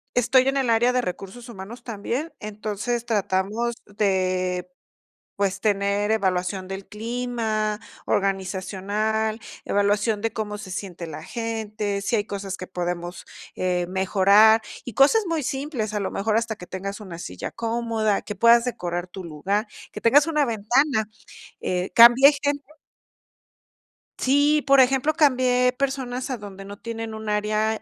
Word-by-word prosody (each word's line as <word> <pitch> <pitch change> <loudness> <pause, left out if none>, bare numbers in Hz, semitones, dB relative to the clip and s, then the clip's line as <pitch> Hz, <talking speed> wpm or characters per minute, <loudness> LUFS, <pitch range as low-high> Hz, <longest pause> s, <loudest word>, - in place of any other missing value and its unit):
Estoy 250 +2 +5
en 275 - 0
el 265 -3 +1
área 230 +2 +4
de 250 - +1
recursos 195 +3 -6
humanos 225 +1 -9
también, 240 +8 -4
entonces 215 +3 -3
tratamos 215 +2 0
de, 185 -3 0 0.7
pues, 200 -1 0
tener 200 0 +1
evaluación 185 -2 0
del 195 +1 -7
clima 220 -2 -2 0.3
organizacional, 200 +3 -1 0.3
evaluación 205 +1 +1
de 225 -1 -1
cómo 215 -2 -4
se 205 -2 -9
siente 180 -2 -6
la 155 -1 -8
gente, 215 -1 -3
si 200 +4 0
hay 205 - 0
cosas 200 -2 -5
que 185 - -7
podemos, 175 -1 -4 0.3
eh, 180 -1 0
mejorar, 200 +4 +5 0.2
y 245 - -6
cosas 355 +11 +5
muy 330 -2 -1
simples, 270 -4 -3
a 210 - -1
lo 195 - -2
mejor 215 +2 +1
hasta 225 -1 -2
que 180 - -11
tengas 195 +3 -6
una 185 -5 -8
silla 90 - -6
cómoda, 225 -2 -1
que 210 - -6
puedas 235 +2 +5
decorar 180 -7 -3
tu 185 +1 -9
lugar, 190 +7 -2 0.3
que - - -7
tengas 285 +6 +5
una 300 -3 +1
ventana. 235 +2 +1 0.6
Eh, 180 0 -2
cambie 240 +5 +9
gente 285 0 0 1.6
sí, 290 +3 +3
por 275 0 +6
ejemplo, 265 +3 +4
cambié 255 -4 +3
personas 265 -2 -2
a 255 - -2
donde 195 -2 -10
no 200 +1 -9
tienen 225 0 -6
un 220 0 -6
área 215 +1 0
215 Hz, 145 wpm, -24 LUFS, 195-240 Hz, 1.6 s, cambie